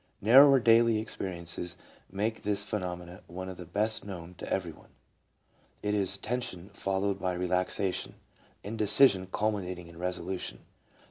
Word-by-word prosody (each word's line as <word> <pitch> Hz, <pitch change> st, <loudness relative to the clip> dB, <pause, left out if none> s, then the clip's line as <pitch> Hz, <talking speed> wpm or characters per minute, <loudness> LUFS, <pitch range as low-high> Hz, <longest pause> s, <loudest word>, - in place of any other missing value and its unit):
Narrower 135 Hz, +6 st, +8 dB
daily 115 Hz, -1 st, +5 dB
experiences 90 Hz, -4 st, -4 dB, 0.3 s
make 105 Hz, +3 st, -2 dB
this 100 Hz, 0 st, 0 dB
phenomenon 90 Hz, -3 st, -5 dB
one 95 Hz, +2 st, -6 dB
of 95 Hz, -, -8 dB
the 90 Hz, -, -9 dB
best 105 Hz, +5 st, 0 dB
known 90 Hz, -3 st, -8 dB
to -, -, -7 dB
every 90 Hz, -3 st, -1 dB
one: -, -, -18 dB, 0.9 s
it 105 Hz, 0 st, 0 dB
is 100 Hz, -1 st, +2 dB
tension 100 Hz, -6 st, -4 dB
followed 100 Hz, 0 st, -1 dB
by 90 Hz, -1 st, -1 dB
re 90 Hz, 0 st, -2 dB
laxation; 90 Hz, +1 st, -1 dB, 0.5 s
indecision 105 Hz, -1 st, +4 dB
culminating 95 Hz, -5 st, -2 dB
in 85 Hz, 0 st, -13 dB
resolution. 90 Hz, +1 st, -4 dB
95 Hz, 135 wpm, -30 LUFS, 90-105 Hz, 0.9 s, Narrower